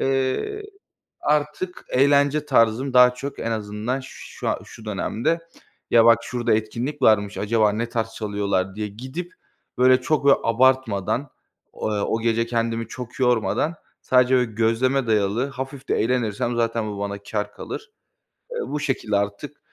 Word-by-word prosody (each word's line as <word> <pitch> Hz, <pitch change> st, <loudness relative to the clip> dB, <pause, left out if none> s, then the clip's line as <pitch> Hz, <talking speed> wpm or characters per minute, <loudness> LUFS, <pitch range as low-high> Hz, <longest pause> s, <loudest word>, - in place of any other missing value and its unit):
Eee, 135 Hz, -, 0 dB, 0.6 s
artık 150 Hz, +5 st, -1 dB
eğlence 145 Hz, +2 st, +3 dB
tarzım 125 Hz, 0 st, +2 dB
daha 125 Hz, 0 st, +7 dB
çok 135 Hz, +3 st, -7 dB
en 115 Hz, -, -2 dB
azından 110 Hz, +4 st, -3 dB
şu -, -, -6 dB
a -, -, -1 dB
şu 110 Hz, -, -13 dB
dönemde 110 Hz, +9 st, -1 dB, 0.5 s
"Ya 115 Hz, -1 st, +6 dB
bak 115 Hz, 0 st, +7 dB
şurada 120 Hz, -2 st, 0 dB
etkinlik 120 Hz, +7 st, -2 dB
varmış 105 Hz, -4 st, +3 dB
acaba 105 Hz, 0 st, +2 dB
ne 115 Hz, +3 st, -2 dB
tarz 115 Hz, -1 st, -2 dB
çalıyorlar?" 100 Hz, -3 st, -1 dB
diye 105 Hz, 0 st, -3 dB
gidip, 130 Hz, -, -7 dB, 0.4 s
böyle, 130 Hz, 0 st, +5 dB
çok, 145 Hz, +2 st, 0 dB
böyle, 140 Hz, -, +7 dB
abartmadan 125 Hz, 0 st, +2 dB, 0.4 s
o -, -, -3 dB
o 105 Hz, +2 st, 0 dB
gece 115 Hz, 0 st, +1 dB
kendimi 115 Hz, -1 st, -1 dB
çok 125 Hz, +1 st, -8 dB
yormadan 125 Hz, +6 st, +1 dB, 0.3 s
sadece, 125 Hz, 0 st, +4 dB
böyle, 125 Hz, -3 st, +1 dB
gözleme 115 Hz, +4 st, +1 dB
dayalı 110 Hz, +4 st, +1 dB
hafif 135 Hz, +1 st, -7 dB
de -, -, +2 dB
eğlenirsem 120 Hz, -1 st, 0 dB
zaten 115 Hz, -1 st, 0 dB
bu 100 Hz, -, -6 dB
bana 100 Hz, 0 st, -3 dB
kâr 105 Hz, 0 st, -3 dB
kalır. 440 Hz, +2 st, -8 dB, 0.6 s
Eee, 485 Hz, -, -4 dB
bu 150 Hz, -, -3 dB
şekilde 115 Hz, -7 st, -1 dB
artık 100 Hz, +9 st, -3 dB
120 Hz, 150 wpm, -23 LUFS, 110-135 Hz, 0.6 s, daha